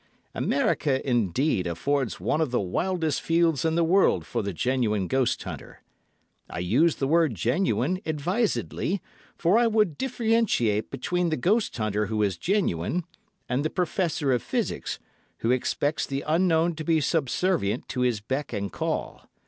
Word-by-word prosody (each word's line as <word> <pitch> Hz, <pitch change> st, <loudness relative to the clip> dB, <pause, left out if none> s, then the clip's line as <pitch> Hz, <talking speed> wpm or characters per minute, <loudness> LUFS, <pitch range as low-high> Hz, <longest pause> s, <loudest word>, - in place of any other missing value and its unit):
America, 140 Hz, -2 st, 0 dB
indeed, 120 Hz, -, +1 dB
affords 120 Hz, -, -1 dB
one 115 Hz, -, 0 dB
of 155 Hz, -, +1 dB
the 120 Hz, -, 0 dB
wildest 160 Hz, -, -1 dB
fields 165 Hz, -4 st, +2 dB
in 160 Hz, 0 st, +1 dB
the 170 Hz, -, +3 dB
world 165 Hz, -, +3 dB
for 115 Hz, +6 st, -2 dB
the 100 Hz, -1 st, -3 dB
genuine 105 Hz, -1 st, 0 dB
ghost 130 Hz, +1 st, 0 dB
hunter. -, -, -9 dB, 0.7 s
I -, -, -7 dB
use 120 Hz, -, +2 dB
the 135 Hz, -, -1 dB
word 160 Hz, -4 st, +3 dB
genuine 125 Hz, -, 0 dB
advisedly, 180 Hz, +4 st, -1 dB, 0.4 s
for 180 Hz, +7 st, +3 dB
I 240 Hz, -, +4 dB
would 210 Hz, -9 st, +1 dB
differentiate 225 Hz, -, +1 dB
between 175 Hz, +6 st, -1 dB
the 155 Hz, -, -1 dB
ghost 205 Hz, -, +1 dB
hunter 105 Hz, -2 st, 0 dB
who 105 Hz, 0 st, 0 dB
is 100 Hz, -3 st, 0 dB
genuine, 175 Hz, -, 0 dB, 0.4 s
and 125 Hz, +3 st, 0 dB
the 155 Hz, -, 0 dB
professor 170 Hz, -5 st, 0 dB
of 125 Hz, -2 st, +2 dB
physics, -, -, -2 dB, 0.4 s
who 115 Hz, -, 0 dB
expects 145 Hz, +4 st, 0 dB
the 135 Hz, 0 st, -3 dB
Unknown 165 Hz, +1 st, +2 dB
to 155 Hz, -, -4 dB
be 160 Hz, 0 st, +2 dB
subservient 150 Hz, -, 0 dB
to 125 Hz, -, -2 dB
his 120 Hz, -4 st, +1 dB
beck 130 Hz, +6 st, -3 dB
and 100 Hz, 0 st, -3 dB
call. -, -, -3 dB
145 Hz, 155 wpm, -26 LUFS, 115-170 Hz, 0.7 s, I